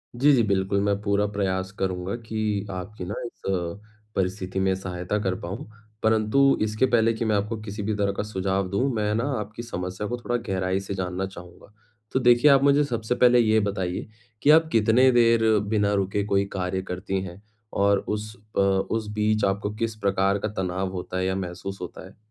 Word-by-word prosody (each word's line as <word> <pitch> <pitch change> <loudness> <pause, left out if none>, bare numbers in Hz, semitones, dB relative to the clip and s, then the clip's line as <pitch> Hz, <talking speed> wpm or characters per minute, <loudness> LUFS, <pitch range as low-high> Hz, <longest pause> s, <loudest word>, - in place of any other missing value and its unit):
जी 140 +5 +5
जी, 120 -4 +4
बिल्कुल। 100 0 +1
मैं 100 0 +1
पूरा 100 0 +1
प्रयास 95 -2 -1
करूँगा 95 +1 -2
कि 110 -3 -2
आपकी 95 +1 -6
ना 95 - -4
इस 120 - -10
अ, 90 +2 -3 0.3
परिस्थिति 95 0 -2
में 95 0 +2
सहायता 95 +1 -3
कर 95 -1 0
पाऊँ। 95 +11 -6 0.4
परंतु 110 +5 +3
इसके 110 +3 +2
पहले 115 -2 +3
कि 115 +1 -3
मैं 110 -1 +2
आपको 105 +3 -1
किसी 105 0 -6
भी 110 +2 -1
तरह 100 -1 +1
का - - 0
सुझाव 95 -2 -1
दूँ, 115 +9 +1
मैं 105 -1 0
ना 115 - 0 0.2
आपकी 105 +3 -6
समस्या 95 -2 -4
को 120 - -3
थोड़ा 120 0 -3
गहराई 95 -1 0
से 100 0 -5
जानना 95 0 -2
चाहूँगा। 90 +2 -13 0.4
तो 130 - +1
देखिए 120 +3 +6
आप 135 0 +5
मुझे 140 +1 +5
सबसे 120 -3 -2
पहले 125 0 +5
ये 110 -1 +4
बताइए 95 -3 -2 0.3
कि 145 - +2
आप 160 +1 +7
कितने 115 +4 +5
देर 115 -2 +4 0.3
बिना 105 -2 +2
रुके 100 +1 0
कोई 100 -1 +2
कार्य 95 0 -2
करती 95 +1 -3
हैं? 90 +1 -9 0.3
और 100 0 +3
उस 105 +1 -3 0.2
अ, - - +4
उस 100 +3 +1
बीच 105 0 +1
आपको 100 +1 -1
किस 115 0 -2
प्रकार 100 -1 +1
का 105 - -2
तनाव 95 +1 -2
होता 90 0 -5
है 95 - 0
या 95 0 0
महसूस 95 +1 -5
होता 90 - -7
है? - - -18
100 Hz, 195 wpm, -25 LUFS, 95-110 Hz, 0.4 s, आप